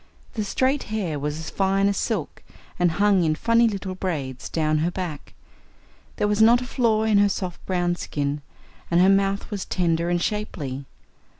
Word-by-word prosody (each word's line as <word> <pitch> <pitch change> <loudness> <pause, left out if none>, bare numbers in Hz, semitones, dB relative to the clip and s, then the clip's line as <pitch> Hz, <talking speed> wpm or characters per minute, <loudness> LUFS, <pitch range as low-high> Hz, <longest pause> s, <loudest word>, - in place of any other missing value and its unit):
The 215 - -2
straight 260 +7 +1
hair 185 -9 -2
was 150 +1 -3
as 160 0 -6
fine 195 0 +2
as 200 - +1
silk, 195 -7 -3 0.4
and 175 -2 +3
hung 200 -1 +3
in 155 -1 +1
funny 230 +6 +3
little 195 -3 -3
braids 150 -9 -4
down 155 -1 +1
her 165 +3 +1
back; 155 - -6 0.8
there 210 - 0
was 210 +1 +1
not 235 +2 +7
a 250 - -5
flaw 230 -4 +1
in 215 -2 +3
her 205 0 +4
soft 180 -3 -4
brown 175 -2 0
skin, 145 -3 -3 0.5
and 170 - +3
her 185 +2 +6
mouth 195 +2 +1
was 200 -2 -3
tender 170 -1 0
and 175 0 +1
shapely. 150 -10 -3
185 Hz, 180 wpm, -24 LUFS, 160-210 Hz, 0.8 s, not